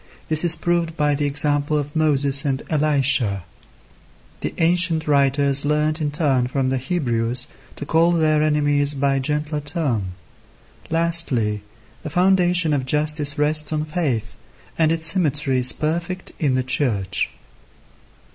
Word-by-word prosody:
This 155 +1 0
is 170 -1 +3
proved 170 0 -1
by 150 -1 +2
the 145 0 -1
example 145 +1 0
of 145 +1 -4
Moses 140 -3 +2
and 135 -1 -2
Elisha. 140 - +1 1.0
The - - -3
ancient 170 -1 +3
writers 140 -1 +2
learnt 150 +2 0
in 150 - 0
turn 140 -5 +1
from 130 0 -1
the 130 0 -1
Hebrews 125 -5 -2 0.3
to 145 - -7
call 165 +3 +3
their 155 -3 +2
enemies 145 -1 +1
by 140 0 +1
a - - 0
gentler 150 +2 -2
term. 140 - -2 0.8
Lastly, 160 -11 +1 0.4
the - - -6
foundation 180 -1 +2
of 140 -2 0
justice 150 0 0
rests 150 +1 +1
on 155 -1 -1
faith, 135 -10 -2 0.4
and 160 -1 +2
its 165 -1 0
symmetry 150 -6 +1
is 125 0 +2
perfect 170 +4 -3
in 140 -5 +1
the 130 - 0
Church. 125 -8 -1
150 Hz, 140 wpm, -21 LUFS, 135-160 Hz, 1.0 s, is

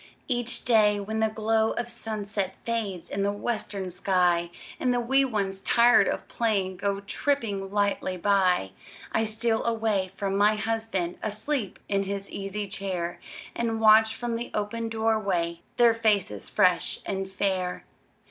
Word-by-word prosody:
Each 245 -2 -1
day, 210 -3 +4
when 220 +2 -3
the 220 0 +2
glow 220 0 +1
of 240 - -3
sunset 210 -4 -3
Fades 215 -7 -3
in 195 - -3
the 200 +1 +1
western 205 -3 -3
sky, 180 -2 +2 0.3
And 250 - +1
the 245 - +1
wee 265 +3 +3
ones, 195 -5 -2
tired 235 +4 +5
of - - -2
playing, 200 -6 -1
Go 200 +1 -1
tripping 205 -3 -1
lightly 200 -2 0
by, 185 - +2 0.4
I 225 - +1
steal 220 +1 0
away 220 -5 0
from 195 -1 -2
my 205 +2 +4
husband, 215 -5 -2
Asleep 215 +2 -2
in 200 -1 +1
his 200 0 -5
easy 200 +1 -4
chair, 185 -4 -3 0.4
And 225 -1 -1
watch 220 0 +6
from 240 -1 -3
the 235 - -5
open 225 +2 -2
door 225 0 +1
way 170 -4 -1 0.2
Their 235 -1 +6
faces 205 - 0
fresh - - +2
and 195 -1 -3
fair. 190 -2 -2
210 Hz, 150 wpm, -27 LUFS, 195-225 Hz, 0.4 s, watch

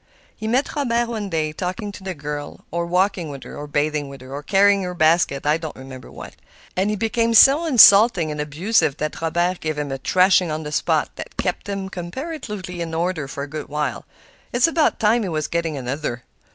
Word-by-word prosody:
He 220 - -6
met 255 +5 0
Robert 240 -5 0
one 215 -4 -4
day 155 -3 -1
talking 185 +5 -4
to 200 - -11
the 190 -1 -5
girl, 145 0 -7
or 170 +1 -2
walking 180 -2 0
with 140 -2 -8
her, - - -10
or 145 0 -7
bathing 145 0 -1
with 135 -1 -11
her, 130 +1 -10
or 145 - -5
carrying 200 +4 +3
her 180 -1 -4
basket—I 155 -2 +2
don't 160 -2 -7
remember 130 -1 -11
what;—and 190 +3 -6
he 210 - 0
became 230 +2 0
so 280 +8 +7
insulting 205 - +7
and 150 0 -3
abusive 150 +1 +1
that 155 +1 -4
Robert 175 +2 0
gave 155 -1 -3
him 145 -2 -3
a 135 - -4
thrashing 185 +5 +3
on 155 +1 -3
the 150 - -6
spot - - 0
that - - -6
has - - -1
kept - - -3
him 195 -1 -3
comparatively 190 - -6
in 165 -1 -4
order 165 -3 -1
for 140 +1 -5
a - - -6
good 150 0 -6
while. 150 0 -3 0.5
It's 245 +1 +3
about 330 -1 +1
time 225 +2 +3
he 195 - -3
was 155 -2 -2
getting 165 -3 -2
another." 125 -1 -4
170 Hz, 205 wpm, -21 LUFS, 150-205 Hz, 0.5 s, so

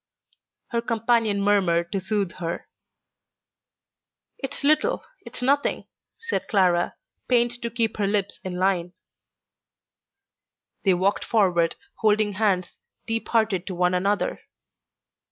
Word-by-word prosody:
Her 235 -1 0
companion 230 -3 +1
murmured 180 -4 +2
to 195 - 0
soothe 195 -1 -1
her. 170 -1 -4 1.7
"It's 270 0 -5
little, 305 +2 +2 0.2
it's - - -7
nothing," 280 +3 +1 0.3
said 460 0 -3
Clara, 180 -4 +2 0.3
pained 240 -1 +2
to 235 - -2
keep 230 -2 0
her 205 -2 +1
lips 200 -1 0
in 185 -1 -4
line. 180 -1 0 1.9
They 190 -2 +5
walked 190 +3 +1
forward, 180 -7 +2 0.2
holding 215 -1 +2
hands, 190 -3 0 0.3
deep 225 -1 -1
hearted 220 -6 +1
to 185 - -4
one 180 +1 +2
another. 200 +3 0
205 Hz, 115 wpm, -24 LUFS, 185-230 Hz, 1.9 s, They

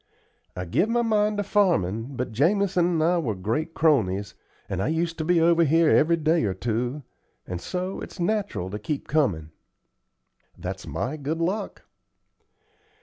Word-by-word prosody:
I 90 - -4
give 185 - +1
my 240 +1 +2
mind 210 -2 +1
to 205 - 0
farmin'; 140 - +1
but 125 -1 -3
Jamison 180 - +2
and 165 -3 +1
I 175 +2 +3
were 120 -10 -2
great 115 - -2
cronies, 100 - +2 0.3
and - - -3
I - - 0
used 165 +2 -1
to - - 0
be 175 +1 +3
over 170 +1 +4
here 165 +1 +4
every 165 +2 +4
day 160 0 +2
or 95 -2 -1
two, 120 +7 -2 0.4
and 90 -1 -5
so 185 - -4
it's - - -9
natural 185 - -1
to 105 - -4
keep 140 +7 -4
comin'." 95 - 0 1.1
"That's - - -6
my 140 +5 -3
good 150 +2 -3
luck." 190 +5 -2
155 Hz, 160 wpm, -25 LUFS, 115-175 Hz, 1.1 s, over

